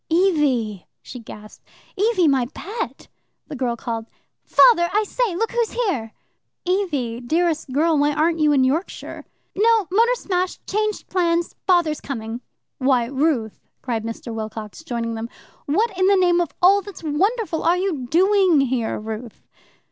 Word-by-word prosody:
"Evie!" 290 - +1 0.2
she 250 - -9
gasped. 215 -2 -12 0.3
"Evie, 405 -4 +2
my 265 -4 +2
pet 440 +6 -6 0.2
" - - -51
The - - -5
girl 245 -3 -1
called, 230 -1 -5 0.4
"Father! 345 -8 +5
I 425 +2 +2
say! 430 -2 -1
look 450 +5 -1
who's 475 -2 -1
here." 345 - -1 0.5
"Evie, 300 - -1
dearest 315 +2 0
girl, 315 +4 +2
why 290 +1 +3
aren't 320 +3 +1
you 300 -1 +4
in 275 -3 +4
Yorkshire?" 300 +8 -2 0.3
"No 440 -1 +3
motor 465 +5 +3
smash 370 -5 -2
changed 425 0 -2
plans 345 -2 0
Father's 345 -5 +2
coming." 230 -2 -5 0.4
"Why, 260 -3 +2
Ruth!" 265 -4 -1 0.2
cried 230 -4 -2
Mr. 230 0 -6
Wilcox, 220 +3 -7
joining 235 -5 -3
them. 225 +1 -5 0.4
"What 405 +8 +1
in 370 +1 +2
the 400 - +5
name 350 -1 +3
of 340 - -1
all 395 +2 +6
that's 400 -3 -11
wonderful 375 +4 0
are 345 +2 +3
you 350 -10 -2
doing 370 +1 +4
here, 245 -4 -1
Ruth?" 220 +1 -7
320 Hz, 155 wpm, -22 LUFS, 245-380 Hz, 0.5 s, all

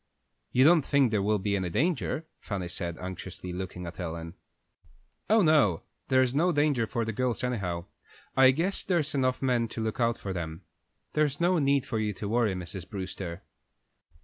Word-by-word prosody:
"You 130 - +4
don't 160 +2 +7
think 135 -3 +2
there 105 -2 +2
will 105 +2 +2
be 100 +1 -1
any 95 -2 -1
danger?" 155 - 0
Fanny 95 -4 -4
said, 85 -1 -3
anxiously, 90 0 -7
looking 90 -1 -5
at 85 +2 -8
Ellen. 85 -1 -5 1.0
"Oh 220 -1 +5
no, 145 - +4 0.2
there's 130 -1 +3
no 170 +6 +3
danger 145 -7 +2
for 115 +2 -1
the 115 - -3
girls, 125 0 -1
anyhow. 95 -9 -2 0.5
I 130 -1 +7
guess 165 +9 0
there's 165 -6 0
enough 130 -1 0
men 120 -3 +2
to 110 0 -5
look 110 +4 -3
out 115 -1 +2
for 95 - -5
them. 80 -2 -5 0.5
There's 150 -2 +1
no 175 0 +3
need 140 -2 +2
for 110 - -2
you 105 -1 -1
to 100 +2 -5
worry, 110 -2 +1
Mrs. 90 0 -7
Brewster." 95 -3 -5
115 Hz, 175 wpm, -28 LUFS, 95-140 Hz, 1.0 s, don't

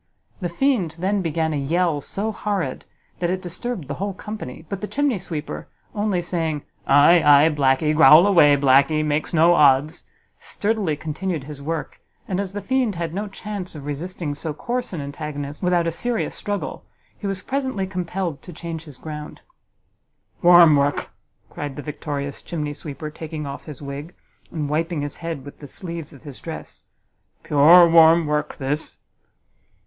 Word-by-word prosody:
The 175 - -2
fiend 185 - 0
then 195 +3 0
began 160 -2 -1
a - - -1
yell 160 +2 0
so 210 +9 -3
horrid, 200 -10 -3 0.3
that 175 0 0
it 185 +1 -1
disturbed 185 - -5
the - - -3
whole 200 -1 -2
company; 190 -9 -7
but 195 +2 -5
the 210 - -3
chimney 275 -6 0
sweeper, 155 -4 -6 0.3
only 205 -4 0
saying, 165 -4 -2 0.2
"Aye, 145 +5 +6
aye, 145 +2 +7
blacky, 145 0 +2
growl 155 +3 +8
away, 155 -8 +6
blacky, 140 +3 +4
makes 150 0 -1
no 170 0 +5
odds," 145 -1 +3 0.3
sturdily 205 -7 -1
continued 160 +1 -3
his 145 0 -9
work, 160 +2 -4 0.3
and, 190 -1 -2
as 195 -1 -3
the 205 -1 -5
fiend 250 -3 0
had 165 -1 -3
no 205 +3 -3
chance 200 -3 -6
of 145 -2 -8
resisting 150 +1 -4
so 150 +1 -5
coarse 245 +9 -3
an 170 -5 -4
antagonist 145 0 -6
without 180 -2 +2
a 165 - 0
serious 235 +7 -1
struggle, 205 -1 -4 0.3
he 205 - -6
was 195 -1 -3
presently 260 -7 -2
compelled 180 -3 -3
to 180 - -11
change 165 -1 -6
his 145 -5 -11
ground. 150 -1 -8 1.0
"Warm 175 -3 +8
work!" 140 +1 0 0.4
cried 145 -2 -5
the 145 - -7
victorious 145 -2 -5
chimney 150 -3 -4
sweeper, 150 +1 -7
taking 155 -1 -6
off 140 0 -7
his 150 -2 -9
wig, 140 +5 -7 0.3
and 155 -3 -3
wiping 160 +1 -1
his 145 - -6
head 165 -5 -5
with 145 - -11
the 145 - -10
sleeves 170 -1 -7
of 140 -2 -15
his 145 -4 -10
dress, - - -9 0.6
"pure 165 +5 +7
warm 165 0 +6
work 150 0 -2
this!" 145 +3 -3
165 Hz, 165 wpm, -22 LUFS, 145-185 Hz, 1.0 s, growl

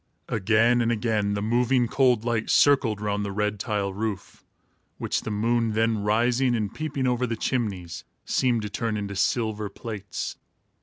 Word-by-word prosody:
Again 115 +3 +3
and 115 0 +1
again 105 -3 0
the 100 - -2
moving, 120 +2 +2
cold 125 -2 +2
light 115 -2 -1
circled 130 -7 +4
round 105 0 -1
the 100 - -3
red 105 0 -1
tile 105 -4 -2
roof, 105 -1 -5 0.5
which - - -1
the - - -5
moon, 115 +1 +1
then 110 0 +1
rising 120 +4 +2
and 105 -2 -2
peeping 145 -4 -3
over 125 0 +1
the 115 - -2
chimneys, 100 -9 -3 0.2
seemed 120 -4 +1
to 105 - -4
turn 115 -1 -2
into 100 -1 -4
silver 105 +1 0
plates. 105 -3 -6
110 Hz, 160 wpm, -25 LUFS, 105-120 Hz, 0.5 s, circled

